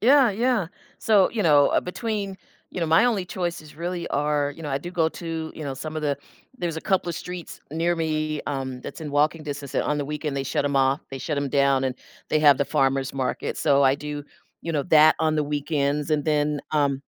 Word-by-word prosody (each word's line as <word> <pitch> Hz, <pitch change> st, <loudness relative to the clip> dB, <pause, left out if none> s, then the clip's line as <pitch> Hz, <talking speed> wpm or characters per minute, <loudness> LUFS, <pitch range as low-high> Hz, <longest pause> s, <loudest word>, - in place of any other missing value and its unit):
Yeah, 260 Hz, +1 st, +6 dB
yeah, 230 Hz, -1 st, +1 dB, 0.3 s
so, 205 Hz, -4 st, +4 dB
you 225 Hz, -3 st, -1 dB
know, 145 Hz, -4 st, +5 dB
uh, -, -, +2 dB
between 200 Hz, 0 st, -3 dB, 0.4 s
you -, -, -5 dB
know, 165 Hz, -, 0 dB
my 165 Hz, +7 st, +5 dB
only 220 Hz, -7 st, +1 dB
choices 175 Hz, -4 st, -4 dB
really 170 Hz, +1 st, -4 dB
are, 145 Hz, 0 st, 0 dB
you 165 Hz, -, -10 dB
know 150 Hz, -, -4 dB
I 135 Hz, -, 0 dB
do 175 Hz, +5 st, -7 dB
go 165 Hz, -3 st, +2 dB
to, 165 Hz, -1 st, -5 dB
you 155 Hz, -, -6 dB
know, 135 Hz, -2 st, -3 dB
some 155 Hz, +4 st, -6 dB
of 155 Hz, -, -3 dB
the 145 Hz, -2 st, 0 dB, 0.4 s
there's 170 Hz, -8 st, -3 dB
a -, -, -3 dB
couple 190 Hz, 0 st, 0 dB
of 170 Hz, -, -3 dB
streets 180 Hz, -2 st, -7 dB
near 170 Hz, +2 st, +1 dB
me, 155 Hz, -2 st, -1 dB
um, 130 Hz, -2 st, -3 dB
that's -, -, -8 dB
in 155 Hz, -2 st, -5 dB
walking 150 Hz, +3 st, +2 dB
distance, 145 Hz, -2 st, -6 dB
and -, -, +2 dB
on 150 Hz, 0 st, -1 dB
the 145 Hz, -, -1 dB
weekend 150 Hz, 0 st, -3 dB
they 135 Hz, -, -1 dB
shut 135 Hz, -, -1 dB
'em 140 Hz, -1 st, 0 dB
off 135 Hz, +1 st, +3 dB
they 135 Hz, -, -5 dB
shut 145 Hz, +3 st, -3 dB
'em 140 Hz, -1 st, -1 dB
down, 140 Hz, -1 st, +3 dB
and 130 Hz, -1 st, -2 dB, 0.3 s
they 155 Hz, -, +2 dB
have 145 Hz, -3 st, +6 dB
the 140 Hz, -, +2 dB
farmer's 135 Hz, -1 st, +1 dB
market 130 Hz, -2 st, -2 dB
so, 140 Hz, -2 st, +3 dB
I 135 Hz, 0 st, +5 dB
do, 145 Hz, 0 st, -5 dB, 0.4 s
you 170 Hz, -, -3 dB
know, 145 Hz, -3 st, 0 dB
that 155 Hz, -2 st, +6 dB
on 155 Hz, -1 st, +1 dB
the 155 Hz, -, +1 dB
weekends, 145 Hz, 0 st, -1 dB
and 150 Hz, -2 st, +1 dB
then, 150 Hz, -1 st, +1 dB
um 140 Hz, -3 st, +1 dB
150 Hz, 235 wpm, -24 LUFS, 140-170 Hz, 0.4 s, Yeah